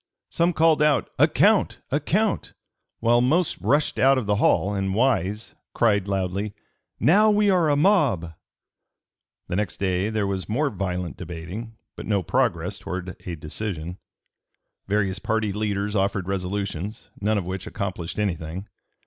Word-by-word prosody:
Some 170 +1 +2
called 160 -1 +4
out 150 -7 +2
"a - - +7
count! - - +3
a - - +2
count!" - - 0 0.5
while 120 +1 +4
most 155 +7 +1
rushed 145 +2 +1
out 135 +1 +5
of 125 - -1
the 105 0 +1
hall, 100 0 +2
and 95 -1 -1
Wise 110 -4 0 0.2
cried 105 -4 +2
loudly, 100 +2 -2 0.4
"Now 210 +7 +5
we 210 -1 +4
are 175 -4 +3
a 145 - +3
mob!" 145 - +2 1.1
The - - -3
next 105 -2 -2
day 95 +1 0
there 110 -2 0
was 95 0 -3
more 140 +6 +1
violent 90 - -3
debating, 90 +8 -7 0.2
but - - -8
no 100 -3 +1
progress - - 0
towards 95 +1 -5 0.2
a 85 - -3
decision. 85 +2 -5 0.9
Various 100 -1 0
party 110 -2 -1
leaders 105 0 -2
offered 100 -2 0
resolutions, 95 +1 -4
none 105 +1 +1
of 95 - -2
which 95 +1 -5
accomplished 95 -5 -4
anything. 90 -2 -3
100 Hz, 150 wpm, -24 LUFS, 95-120 Hz, 1.1 s, a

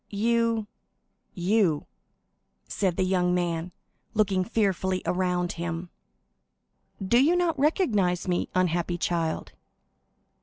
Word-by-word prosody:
"You—you?" 180 -4 +2 0.8
said 185 -4 -1
the - - +2
young 180 -1 +1
man, 175 -1 -1 0.4
looking 195 -3 +2
fearfully 190 -3 0
around 180 -1 0
him. 170 +1 -5 1.1
"Do 235 +7 +3
you 330 +5 +4
not 340 -4 +1
recognize 210 - +1
me, 175 -1 0
unhappy 175 -1 +1
child?" 165 -2 -2
185 Hz, 90 wpm, -26 LUFS, 175-205 Hz, 1.1 s, you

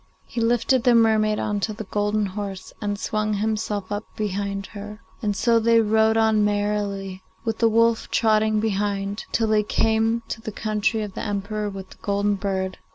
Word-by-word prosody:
He 235 - -4
lifted 235 +2 +2
the 245 -1 +5
mermaid 215 -2 +4
on 210 -1 -1
to 215 +2 -2
the 220 - -6
golden 205 +1 0
horse, 195 -1 -6
and 205 -1 -2
swung 215 0 -1
himself 210 -1 -2
up 205 +1 -2
behind 200 -1 -2
her 210 +1 -8 0.2
and 205 -2 0
so 230 +3 +3
they 230 0 +4
rode 220 0 +3
on 220 -1 +3
merrily, 205 -2 -1 0.2
with 225 -1 -2
the 230 - +4
wolf 230 0 +2
trotting 215 -1 +2
behind, 205 -1 -1
till 225 - +1
they 215 -1 +4
came 225 +2 +1
to 225 - -4
the 225 -1 -5
country 215 +1 -1
of 205 -2 -6
the - - -5
Emperor 205 0 -2
with 195 -1 -8
the - - -14
golden 205 0 +1
bird. 190 -1 -2
210 Hz, 180 wpm, -23 LUFS, 205-220 Hz, 0.2 s, the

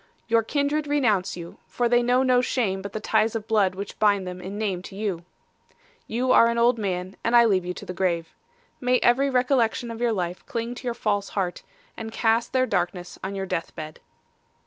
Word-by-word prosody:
Your 230 0 +4
kindred 290 +5 -1
renounce 225 -12 +1
you, 170 -1 -9
for 245 - 0
they 240 +1 +4
know 250 +2 +3
no 250 -1 +4
shame 215 -7 -1
but 200 0 -6
the 215 - -4
ties 220 +1 +1
of 220 -2 -3
blood 205 -4 +2
which 200 +1 -7
bind 200 -3 +3
them 180 0 -6
in 195 +3 -6
name 205 -4 -1
with 180 - -10
you. 195 -4 -3 0.8
'You 250 +3 0
are 230 - +7
an 235 - -1
old 235 0 +3
man, 185 -2 -3
and 230 - +2
I 235 0 +8
leave 190 -5 +2
you 180 - -3
to - - -9
the 180 - -5
grave. 170 -3 -1 0.5
May 250 0 +3
every 270 +3 +4
recollection 250 -2 +1
of 230 0 -7
your 240 -1 +2
life 180 -4 -3
cling 230 0 -3
to 245 +1 -8
your 235 - -1
false 205 -3 -1
heart, 180 -3 -1 0.3
and 225 0 -6
cast 225 +1 +1
their 255 0 +2
darkness 180 -4 -2
on 195 +1 -4
your 195 0 -3
death 165 -3 -4
bed. 155 0 -8
220 Hz, 215 wpm, -25 LUFS, 190-240 Hz, 0.8 s, I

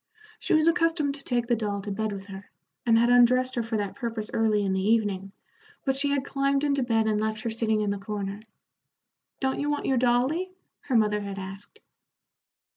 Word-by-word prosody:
She - - +1
was 310 +1 +4
accustomed 330 -3 +2
to 275 -1 -5
take 240 -3 0
the 240 0 +2
doll 205 -2 -2
to 205 - -4
bed 215 +2 -2
with 195 -1 -6
her, 195 0 -10 0.4
and 225 -1 +5
had 235 +1 +4
undressed 255 +1 +5
her 240 - 0
for 225 -1 -2
that 205 -2 -3
purpose 230 -4 -4
early 215 -2 +2
in 190 - 0
the 190 - 0
evening, 200 -2 +1 0.5
but 270 -1 +1
she 280 +1 +1
had 280 -1 0
climbed 275 0 0
into 280 -2 +1
bed 225 -3 +1
and 215 -1 +1
left 220 0 -2
her 230 - -3
sitting 220 -1 0
in 205 -1 0
the 200 - -3
corner. 200 0 -5 1.0
"Don't 265 0 -1
you 290 - -1
want 295 0 -1
your 265 - +2
dolly?" 260 +10 +1 0.3
her 265 - -1
mother 210 -2 +3
had 200 -1 -6
asked. 195 - -9
230 Hz, 205 wpm, -26 LUFS, 210-270 Hz, 1.0 s, and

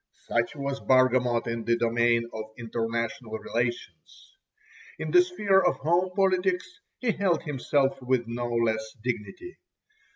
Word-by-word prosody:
Such 120 +4 0
was 140 -1 -3
Bargamot 125 -2 +3
in 115 -1 -3
the 115 +1 +2
domain 115 0 +2
of 110 -1 -5
international 115 +1 -3
relations. 120 - -5 0.6
In - - -4
the 360 - +7
sphere 210 - +2
of - - +2
home 175 +5 +1
politics 190 - +1 0.2
he 245 -3 0
held 190 -5 0
himself 140 -1 0
with 125 -1 +1
no 120 +1 -3
less 110 -2 0
dignity. 125 - -6
125 Hz, 130 wpm, -27 LUFS, 115-175 Hz, 0.6 s, the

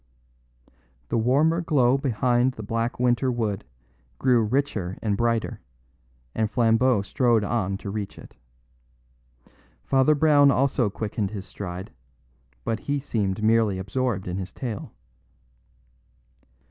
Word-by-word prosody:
The - - 0
warmer 150 +9 +2
glow 135 -7 +3
behind 125 -1 +1
the 110 - -8
black 115 +3 -2
winter 125 +1 +2
wood 110 -5 -2 0.5
grew 125 - +3
richer 110 -6 -1
and 105 -2 -1
brighter, 115 +1 -1 0.7
and 110 -1 0
Flambeau 115 -1 +3
strode 115 +1 +2
on 100 -3 -1
to 100 - -6
reach 105 -1 -5
it. - - -13 1.5
Father 135 +3 +3
Brown 145 -1 +5
also 135 -4 +2
quickened 105 0 -3
his 100 -2 -7
stride; 95 -1 -7 0.7
but 110 - -2
he 145 +5 -2
seemed 105 -7 -2
merely 110 -3 +3
absorbed 100 +1 -2
in 90 +1 -3
his 95 -1 -5
tale. 115 -6 -6
115 Hz, 120 wpm, -25 LUFS, 100-130 Hz, 1.5 s, Brown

